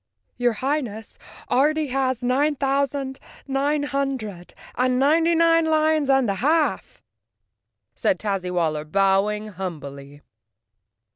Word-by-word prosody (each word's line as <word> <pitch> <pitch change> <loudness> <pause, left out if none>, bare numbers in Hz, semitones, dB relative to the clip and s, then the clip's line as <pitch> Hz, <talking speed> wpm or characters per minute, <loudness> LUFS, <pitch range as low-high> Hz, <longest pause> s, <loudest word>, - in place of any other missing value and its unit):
"Your 245 -1 +2
Highness 240 -4 -3 0.3
already 295 +4 +2
has 260 -2 -1
nine 280 +5 +1
thousand 275 0 -1 0.3
nine 285 +2 0
hun¬ 275 -1 -1
dred 200 -7 -9 0.2
and 255 0 +1
ninety 325 +5 +3
nine 330 0 +4
lions 310 -2 +2
and 270 -2 +3
a 200 - +1
half!" 310 +3 0 0.9
said 295 - 0
Tazzy 195 -4 -2
wal¬ 170 -3 0
ler 150 0 -4
bowing 195 +5 +1
humbly. 145 -7 -8
260 Hz, 120 wpm, -23 LUFS, 200-290 Hz, 0.9 s, nine